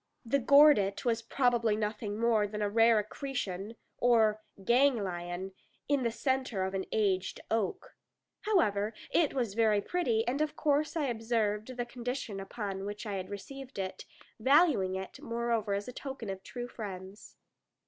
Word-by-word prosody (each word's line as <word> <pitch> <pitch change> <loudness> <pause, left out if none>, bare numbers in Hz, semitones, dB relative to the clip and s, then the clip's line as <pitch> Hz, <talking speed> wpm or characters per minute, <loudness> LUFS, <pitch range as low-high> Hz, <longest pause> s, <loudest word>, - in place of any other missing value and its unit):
The 280 +5 +2
"gordit" 275 -7 +5
was 230 -1 +1
probably 235 -2 +2
nothing 210 0 -3
more 225 -3 +3
than 210 +1 -3
a 205 - 0
rare 225 +1 +5
accretion, 210 -2 -4 0.2
or 220 -3 +4 0.2
ganglion, 190 -8 +1 0.4
in 285 -2 +2
the 235 - +1
centre 260 -4 -1
of 190 +1 -2
an 190 -1 -2
aged 190 -4 0
oak. 225 - -2 0.5
However, 215 - +2 0.2
it 320 -5 +2
was 240 -6 -1
very 215 -2 +3
pretty; 235 - 0
and 270 +4 0
of 305 -1 -1
course 295 +1 +1
I 305 - +1
observed 225 -1 -1
the 240 - -1
condition 240 -3 -4
upon 195 -1 -5
which 205 +2 -5
I 210 - -3
had 185 -1 -5
received 265 +6 -8
it, 190 -1 -4 0.3
valuing 265 - +4
it 190 0 -7
moreover 230 -3 -1
as 200 +1 -4
a 250 - -7
token 265 -6 -6
of 190 0 -7
true 245 +4 -6
friends. 195 -3 -8
225 Hz, 155 wpm, -31 LUFS, 200-250 Hz, 0.5 s, gordit